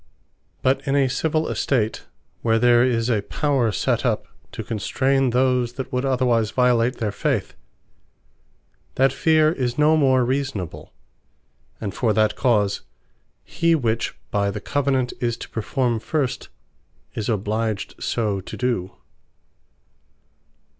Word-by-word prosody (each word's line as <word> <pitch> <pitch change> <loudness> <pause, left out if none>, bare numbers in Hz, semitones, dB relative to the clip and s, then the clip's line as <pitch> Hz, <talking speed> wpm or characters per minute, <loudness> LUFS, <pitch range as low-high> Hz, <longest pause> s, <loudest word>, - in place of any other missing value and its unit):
But 130 +1 +2
in 135 - +1
a 140 -2 +3
civill 155 +4 0
estate, 115 -5 -1 0.3
where 115 -1 +2
there 120 +1 +5
is 120 -2 +1
a 115 -4 +1
Power 135 0 0
set - - 0
up - - 0 0.3
to - - -6
constrain 130 +5 0
those 125 -1 +1
that 130 +1 -6
would 125 +2 0
otherwise 125 -4 +2
violate 125 0 +2
their 110 -3 -1
faith, - - -1 1.4
that 135 0 +3
feare 155 -1 +3
is 125 -5 -2
no 150 +1 +4
more 130 -4 +3
reasonable; 130 - -3 0.9
and 100 -4 -4
for 115 -1 +1
that 110 -1 +2
cause, 105 -6 +1 0.6
he 165 0 +1
which 115 -6 -1 0.2
by 100 -1 +1
the 100 - -4
Covenant 135 0 0
is 120 -1 0
to - - -9
perform 120 +1 -1
first, 135 +2 -2 0.6
is 110 0 -3
obliged 110 0 -1
so 105 -4 -1
to - - -9
do. 120 -8 -2
125 Hz, 130 wpm, -22 LUFS, 110-135 Hz, 1.4 s, there